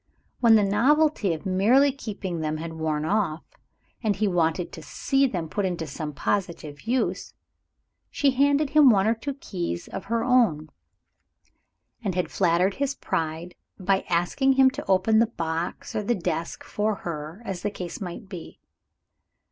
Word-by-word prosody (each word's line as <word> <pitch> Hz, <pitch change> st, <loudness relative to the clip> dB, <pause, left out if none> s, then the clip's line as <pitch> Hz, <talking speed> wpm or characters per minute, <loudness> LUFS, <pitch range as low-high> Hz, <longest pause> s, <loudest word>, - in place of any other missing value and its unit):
When 230 Hz, -2 st, +6 dB
the 215 Hz, -, +5 dB
novelty 245 Hz, -, +3 dB
of 160 Hz, +4 st, -4 dB
merely 225 Hz, +10 st, +4 dB
keeping 200 Hz, -9 st, -5 dB
them 155 Hz, 0 st, -2 dB
had 165 Hz, +1 st, -6 dB
worn 155 Hz, -1 st, -2 dB
off, 180 Hz, -4 st, 0 dB, 0.6 s
and 215 Hz, -3 st, +1 dB
when -, -, -14 dB
he 215 Hz, -, +2 dB
wanted 170 Hz, -1 st, 0 dB
to 160 Hz, -, -9 dB
see 270 Hz, -, +1 dB
them 175 Hz, -9 st, -3 dB
put 185 Hz, +1 st, -1 dB
to 165 Hz, -, -4 dB
some 150 Hz, +1 st, -5 dB
positive 165 Hz, -1 st, -3 dB
use, 250 Hz, +1 st, -1 dB, 0.7 s
she 280 Hz, -1 st, +2 dB
had 280 Hz, +2 st, +3 dB
added 300 Hz, -2 st, -2 dB
one 250 Hz, -11 st, +6 dB
or 220 Hz, -, +3 dB
two 265 Hz, +5 st, -5 dB
keys 175 Hz, -, -4 dB
of -, -, -7 dB
her 230 Hz, +2 st, 0 dB
own, 220 Hz, -, +2 dB, 1.3 s
and 195 Hz, -5 st, -2 dB
had 180 Hz, -, -1 dB
flattered 180 Hz, +1 st, +2 dB
his 280 Hz, +2 st, -2 dB
pride 165 Hz, -, -3 dB, 0.3 s
by 190 Hz, +1 st, +1 dB
asking 180 Hz, +11 st, +2 dB
him 265 Hz, 0 st, +5 dB
to 280 Hz, +2 st, -7 dB
open 195 Hz, +4 st, +4 dB
the 230 Hz, -, +4 dB
box 165 Hz, -5 st, -4 dB
or -, -, 0 dB
the 235 Hz, +4 st, 0 dB
desk 170 Hz, -3 st, -3 dB
for 210 Hz, 0 st, -1 dB
her, 160 Hz, +5 st, -6 dB
as 190 Hz, -4 st, -4 dB
the 205 Hz, -, -1 dB
case 180 Hz, -3 st, -7 dB
might 185 Hz, +2 st, -6 dB
be. 180 Hz, -4 st, -9 dB
195 Hz, 165 wpm, -25 LUFS, 165-235 Hz, 1.3 s, When